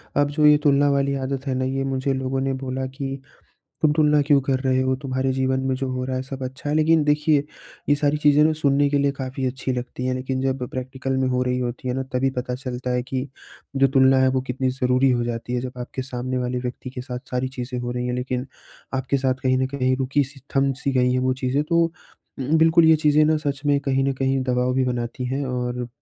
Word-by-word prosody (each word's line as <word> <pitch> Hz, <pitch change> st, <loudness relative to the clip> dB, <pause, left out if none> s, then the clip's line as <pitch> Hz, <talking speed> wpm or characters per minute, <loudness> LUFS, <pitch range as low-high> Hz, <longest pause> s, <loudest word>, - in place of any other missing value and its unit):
अब 145 Hz, 0 st, +3 dB
जो 150 Hz, +1 st, +2 dB
ये 150 Hz, 0 st, +7 dB
तुलना 145 Hz, 0 st, +4 dB
वाली 140 Hz, 0 st, +1 dB
आदत 135 Hz, +1 st, -3 dB
है 135 Hz, -, 0 dB
ना 130 Hz, 0 st, 0 dB
ये 135 Hz, +1 st, -1 dB
मुझे 135 Hz, 0 st, -1 dB
लोगों 130 Hz, 0 st, -2 dB
ने 135 Hz, 0 st, 0 dB
बोला 130 Hz, 0 st, -3 dB
कि 135 Hz, +1 st, -5 dB, 0.6 s
तुम 155 Hz, -, +4 dB
तुलना 150 Hz, -1 st, +4 dB
क्यों 140 Hz, 0 st, +4 dB
कर 130 Hz, -1 st, 0 dB
रहे 130 Hz, -1 st, +1 dB
हो? 130 Hz, 0 st, +1 dB
तुम्हारे 130 Hz, -1 st, -1 dB
जीवन 130 Hz, 0 st, 0 dB
में 130 Hz, -, +1 dB
जो 135 Hz, 0 st, -3 dB
हो 130 Hz, 0 st, -2 dB
रहा 130 Hz, 0 st, -2 dB
है 130 Hz, -, -2 dB
सब 135 Hz, 0 st, -7 dB
अच्छा 130 Hz, +3 st, -6 dB
है। 145 Hz, -, 0 dB
लेकिन 155 Hz, 0 st, +4 dB
देखिए 150 Hz, 0 st, +2 dB, 0.4 s
ये 145 Hz, -, +5 dB
सारी 145 Hz, 0 st, +1 dB
चीज़ें 150 Hz, 0 st, +5 dB
ना 160 Hz, -, +3 dB
सुनने 145 Hz, -2 st, +2 dB
के 145 Hz, -, +2 dB
लिए 140 Hz, 0 st, +2 dB
काफ़ी 130 Hz, -1 st, -5 dB
अच्छी 130 Hz, +1 st, -2 dB
लगती 125 Hz, 0 st, -4 dB
हैं 130 Hz, -, 0 dB
लेकिन 130 Hz, +1 st, -3 dB
जब 135 Hz, -1 st, -1 dB
प्रैक्टिकल 130 Hz, +1 st, -3 dB
में 130 Hz, 0 st, +1 dB
हो 125 Hz, 0 st, +1 dB
रही 125 Hz, 0 st, 0 dB
होती 125 Hz, +1 st, -4 dB
है 125 Hz, -, -1 dB
ना 135 Hz, -, -1 dB
तभी 130 Hz, +1 st, +1 dB
पता 125 Hz, 0 st, -3 dB
चलता 125 Hz, -1 st, -5 dB
है 125 Hz, 0 st, 0 dB
कि 130 Hz, +1 st, -3 dB, 0.5 s
जो 135 Hz, 0 st, +5 dB
तुलना 130 Hz, 0 st, +5 dB
है 130 Hz, -, +4 dB
वो 130 Hz, -, +2 dB
कितनी 130 Hz, +1 st, 0 dB
ज़रूरी 130 Hz, +1 st, +2 dB
हो 120 Hz, -1 st, +1 dB
जाती 120 Hz, 0 st, -4 dB
है। 125 Hz, -, 0 dB
जब 125 Hz, 0 st, -7 dB
आपके 125 Hz, +2 st, -5 dB
सामने 130 Hz, 0 st, -3 dB
वाले 125 Hz, 0 st, -2 dB
व्यक्ति 125 Hz, +1 st, -5 dB
के 125 Hz, -, -6 dB
साथ 125 Hz, -1 st, -5 dB
सारी 125 Hz, +1 st, -1 dB
चीज़ें 125 Hz, -1 st, -5 dB
हो 120 Hz, 0 st, -3 dB
रही 125 Hz, 0 st, -2 dB
हैं 125 Hz, -, -1 dB
लेकिन 125 Hz, +1 st, -3 dB, 0.5 s
आपके 130 Hz, +1 st, 0 dB
साथ 130 Hz, -1 st, +1 dB
कहीं 130 Hz, 0 st, +2 dB
न 130 Hz, -, +1 dB
कहीं 130 Hz, -1 st, +1 dB
रुकी-सी, 135 Hz, +1 st, -1 dB, 0.2 s
थम-सी 135 Hz, 0 st, +1 dB
गई 125 Hz, -1 st, +2 dB
है 130 Hz, -, +1 dB
वो 130 Hz, 0 st, +1 dB
चीज़ें 130 Hz, +2 st, 0 dB
तो 170 Hz, +2 st, +3 dB, 0.5 s
उम, 140 Hz, +4 st, +1 dB
बिल्कुल 165 Hz, +1 st, +5 dB
ये 160 Hz, 0 st, +6 dB
चीज़ें 150 Hz, 0 st, +4 dB
ना 155 Hz, +1 st, +3 dB
सच 145 Hz, -3 st, -3 dB
में 145 Hz, -1 st, +4 dB
कहीं 135 Hz, -1 st, 0 dB
न 135 Hz, -, +1 dB
कहीं 135 Hz, 0 st, 0 dB
दबाव 125 Hz, 0 st, 0 dB
भी 130 Hz, 0 st, +2 dB
बनाती 125 Hz, 0 st, -3 dB
हैं। 135 Hz, +3 st, -2 dB
और 125 Hz, -1 st, -3 dB
130 Hz, 245 wpm, -23 LUFS, 125-140 Hz, 0.6 s, ये